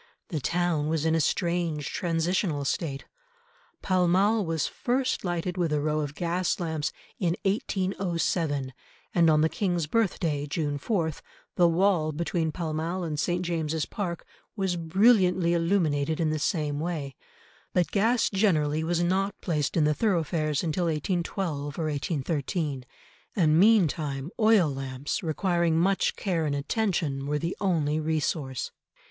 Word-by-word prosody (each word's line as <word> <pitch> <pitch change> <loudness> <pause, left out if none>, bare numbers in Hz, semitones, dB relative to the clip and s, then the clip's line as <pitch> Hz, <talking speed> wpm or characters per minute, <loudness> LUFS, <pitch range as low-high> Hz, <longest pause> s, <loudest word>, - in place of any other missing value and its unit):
The 160 -6 -2
town 170 0 0
was 160 0 0
in 160 - +3
a 165 - +3
strange 170 -3 -1
transitional 165 -3 0
state. 140 -1 -2 0.8
Pall 185 -2 +2
Mall 200 +5 +3
was 165 -3 -1
first 255 +1 -1
lighted 180 0 -2
with 170 -3 0
a 150 - +2
row 155 +1 0
of 145 -1 -3
gas 175 +2 -1
lamps 160 -3 -2 0.3
in 175 -3 +1
1807, 175 -8 -1 0.4
and 170 -2 +5
on 155 -1 +4
the 160 - +4
King's 175 -2 -1
birthday, 160 -7 0
June 145 -2 -2
4, 165 -2 0 0.4
the 175 - +5
wall 170 -2 +2
between 165 +1 -1
Pall 160 -1 -3
Mall 170 +4 -2
and 155 -3 -3
St. 175 +3 0
James's 160 -2 -1
Park 175 -5 -4 0.3
was 190 -4 0
brilliantly 180 0 +3
illuminated 160 -4 +1
in 160 -2 +1
the 155 - -1
same 150 -2 -1
way, 155 -5 -3 0.6
but 180 -2 +1
gas 225 +4 +2
generally 160 -7 +2
was 170 +1 0
not 195 +3 0
placed 150 -3 -1
in 160 - +4
the 150 0 +3
thoroughfares 160 -6 0
until 170 +2 0
1812 160 -2 -2
or 165 - -1
1813, 145 -1 -2 0.5
and 160 -4 +4
meantime 160 -8 +3
oil 215 -6 +5
lamps 135 0 -3
requiring 170 0 +1
much 190 +3 +2
care 170 -6 -1
and 145 - 0
attention 145 -4 -1
were 150 +1 0
the 165 +4 -3
only 155 -6 +1
resource. 155 -4 -2
165 Hz, 145 wpm, -27 LUFS, 150-180 Hz, 0.8 s, and